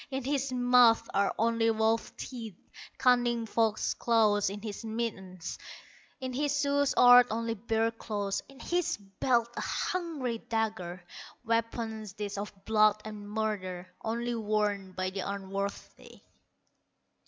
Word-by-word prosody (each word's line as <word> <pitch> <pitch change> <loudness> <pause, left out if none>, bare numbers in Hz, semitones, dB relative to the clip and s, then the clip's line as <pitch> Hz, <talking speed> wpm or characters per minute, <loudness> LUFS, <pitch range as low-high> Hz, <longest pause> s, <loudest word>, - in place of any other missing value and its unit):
In 265 -1 -3
his 275 0 -1
mouth 245 -2 +5
are 200 0 +2
only 230 0 +2
wolf 225 0 0
teeth, 225 -7 -7 0.4
Cunning 240 -2 +3
fox 220 -1 +1
claws 210 -4 +3
in 200 +1 -6
his 215 0 -6
mittens, 205 -6 -4 0.6
In 260 -2 -4
his 290 +2 0
shoes 285 -1 +2
art 245 0 +9
only 230 +1 -1
bear 225 +1 0
claws, 205 -3 -3
In 275 0 -15
his 345 -1 -1
belt 225 +4 0
a - - -3
hungry 300 -10 -2
dagger; 215 -7 -3 0.4
Weapons 225 -2 -2
these 205 -1 -4
of 205 - -4
blood 215 -1 +4
and 210 -1 -8
murder, 185 -4 -3
Only 235 +2 -2
worn 210 -3 -1
by 185 0 -2
the 195 - -5
unworthy." 200 +1 -5
225 Hz, 130 wpm, -30 LUFS, 205-240 Hz, 0.6 s, art